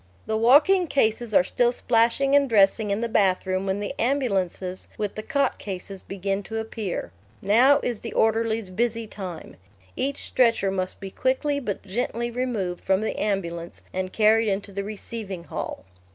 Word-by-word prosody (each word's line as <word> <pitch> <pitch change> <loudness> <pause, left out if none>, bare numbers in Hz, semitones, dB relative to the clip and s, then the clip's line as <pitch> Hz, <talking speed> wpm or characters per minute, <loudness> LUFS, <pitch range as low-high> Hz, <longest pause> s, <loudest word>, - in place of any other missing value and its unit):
The 220 - -1
walking 295 - +5
cases 230 -4 +1
are - - +7
still 240 +6 +2
splashing 245 +3 +2
and 280 -1 +4
dressing 210 0 +4
in 200 +2 0
the 235 - 0
bathroom 190 -2 +1
when 190 +1 0
the 205 - -3
ambulances 195 -8 -1
with 210 -2 -2
the 215 - -5
cot 280 +1 0
cases 195 -1 -6
begin 195 +1 -3
to 225 +3 -6
appear. 220 - -4 0.3
Now 250 +8 +5
is 240 -4 -2
the 230 - -7
orderlies' 225 -2 +1
busy 230 +3 -1
time. 190 -5 -8 0.4
Each 280 +1 -2
stretcher 230 -6 +2
must 185 -1 -3
be 195 -1 -7
quickly 285 +5 0
but 210 -8 -4
gently 235 +3 -2
removed 230 -8 -2
from 190 +1 +2
the 220 - -2
ambulance 170 -5 -3
and 185 0 -2
carried 220 +2 +4
into 200 0 -2
the 200 0 -3
receiving 205 -3 -6
hall. 95 - -6
215 Hz, 165 wpm, -25 LUFS, 195-240 Hz, 0.4 s, are